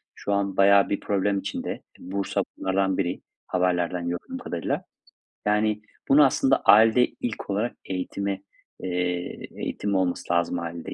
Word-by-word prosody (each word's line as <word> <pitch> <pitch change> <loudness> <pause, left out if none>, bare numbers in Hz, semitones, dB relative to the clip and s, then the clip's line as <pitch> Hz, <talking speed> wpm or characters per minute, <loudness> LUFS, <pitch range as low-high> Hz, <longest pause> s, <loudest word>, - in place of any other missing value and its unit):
şu 100 - -2
an 100 -1 0
bayağı 100 0 +6
bir 100 - 0
problem 100 0 0
içinde. - - -4 0.2
Bursa 95 +2 -2 0.2
bunlardan 95 0 +1
biri 90 -2 -1 0.3
haberlerden 90 -1 0
gördüğüm 85 - -5
kadarıyla. - - -3 0.6
Yani, 105 0 +2 0.3
bunu 145 +1 +7
aslında, 135 0 +3
ailede 115 +3 +6
ilk 110 -4 -6
olarak 105 +5 -1
eğitime, 95 +1 -3 0.4
eee, 90 -1 -2
eğitim 100 -1 -2
olması 90 -2 0
lazım 85 0 +1
ailede. 85 0 -6
95 Hz, 130 wpm, -25 LUFS, 90-100 Hz, 0.6 s, bunu